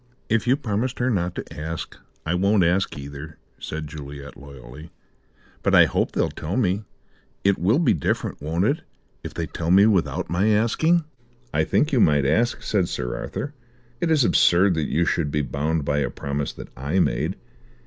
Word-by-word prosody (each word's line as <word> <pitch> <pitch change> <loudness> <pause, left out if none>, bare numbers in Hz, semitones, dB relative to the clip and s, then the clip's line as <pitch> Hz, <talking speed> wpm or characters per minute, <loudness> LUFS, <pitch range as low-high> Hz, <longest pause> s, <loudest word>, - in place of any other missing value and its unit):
"If 115 +1 +1
you 130 +3 +4
promised 125 0 -2
her 125 +1 +1
not 90 -4 -1
to - - -5
ask, 80 +2 -5 0.3
I 80 - 0
won't 100 +2 +3
ask 90 +1 +1
either," 70 +2 -8 0.2
said 80 0 -5
Juliet 70 -1 -9
loyally. 70 +2 -12 0.7
"But - - +2
I - - +8
hope - - 0
they'll - - 0
tell 85 +8 -4
me. 105 -3 0 0.6
It 100 -1 +2
will 100 +9 +3
be 170 - +3
different, 75 - -2
won't 80 +6 0
it, 140 +8 +1 0.4
if - - -7
they 85 - -2
tell 80 0 -4
me 95 +3 +7
without 90 -6 +1
my 90 +6 +1
asking?" 120 +11 +3 0.5
"I - - +2
think 150 - +1
you 130 - +4
might 75 -8 +4
ask," 110 - +1
said 95 -5 0
Sir - - -3
Arthur. 75 - -5 0.5
"It 170 - 0
is 155 -4 +4
absurd 95 -3 +4
that 80 -2 -2
you 85 +3 +2
should 80 -3 0
be 75 +1 0
bound 75 +2 -1
by 70 0 +1
a 70 - 0
promise 70 0 -3
that - - -10
I 70 +8 -2
made. 80 +2 +1
85 Hz, 185 wpm, -23 LUFS, 75-105 Hz, 0.7 s, I